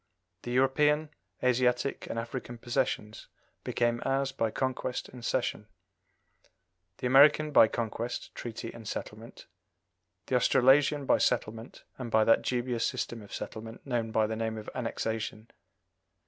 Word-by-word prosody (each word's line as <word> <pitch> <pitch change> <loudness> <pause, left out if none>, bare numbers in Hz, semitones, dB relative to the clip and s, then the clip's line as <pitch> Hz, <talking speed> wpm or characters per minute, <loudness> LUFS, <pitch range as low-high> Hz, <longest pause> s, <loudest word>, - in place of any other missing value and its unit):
The 120 - -6
European, 150 +4 +3 0.3
Asiatic, 125 +1 +1
and - - -4
African 120 +1 -5
possessions 120 -3 -2 0.4
became 120 0 0
ours 135 0 0
by 115 -4 -1
conquest 130 +1 -3
and 125 -2 -11
cession; 120 -4 -1 1.3
the - - -5
American 145 +4 +6
by 115 - +7
conquest, 115 +1 -4
treaty, 115 -1 -6
and 115 -2 -10
settlement; 110 +3 -7 0.8
the 130 - -1
Australasian 135 +3 +4
by - - +3
settlement, 115 -1 -1 0.2
and 125 -2 -4
by 110 -1 +4
that 115 - +4
dubious 120 -2 -1
system 120 -2 -2
of 100 - -14
settlement 110 +1 -7
known 120 -4 -1
by 110 0 +2
the 110 +1 -3
name 110 0 -2
of 105 - -7
annexation. 110 -2 -4
120 Hz, 135 wpm, -29 LUFS, 115-130 Hz, 1.3 s, by